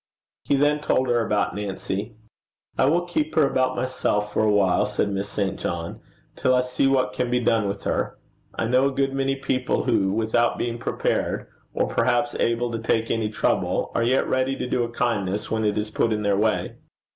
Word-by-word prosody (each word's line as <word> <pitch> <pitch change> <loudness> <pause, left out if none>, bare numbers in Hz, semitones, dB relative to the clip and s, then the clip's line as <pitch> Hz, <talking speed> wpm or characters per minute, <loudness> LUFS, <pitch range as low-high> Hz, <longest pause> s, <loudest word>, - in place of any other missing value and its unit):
He - - +2
then 145 +2 +2
told 130 -3 +1
her 120 -1 +2
about 105 -2 0
Nancy. 100 +1 -4 0.6
'I - - +3
will 170 +5 +2
keep 155 -3 -2
her 155 - +5
about 130 -1 +1
myself 105 -5 -1
for - - +1
a 110 - +3
while,' 95 -3 +3
said 105 -1 -1
Miss 100 +1 -3
St. 100 -2 -2
John, 85 -1 -4 0.3
'till 130 - +2
I 125 - +4
see 125 +2 0
what 130 -6 +2
can 125 +3 -1
be 125 0 +2
done 115 -3 +2
with 100 0 -4
her. - - -1 0.4
I - - -1
know 130 +4 +3
a - - -1
good 135 0 0
many 135 0 0
people 130 -1 -1
who 95 0 +2
without 115 +3 +1
being 120 0 -3
prepared, - - -1 0.3
or - - +2
perhaps 130 +3 +1
able 115 +1 +1
to 115 - -3
take 115 0 0
any 110 -2 0
trouble, 105 - 0
are - - +1
yet 125 +3 +2
ready 130 +1 +1
to - - -4
do 125 - 0
a 120 - -3
kindness 105 -4 -1
when 110 0 0
it 105 -1 +1
is 105 0 -2
put 115 - +1
in 105 -1 -1
their 100 -1 +2
way.' 110 +2 0
115 Hz, 205 wpm, -24 LUFS, 105-130 Hz, 0.6 s, her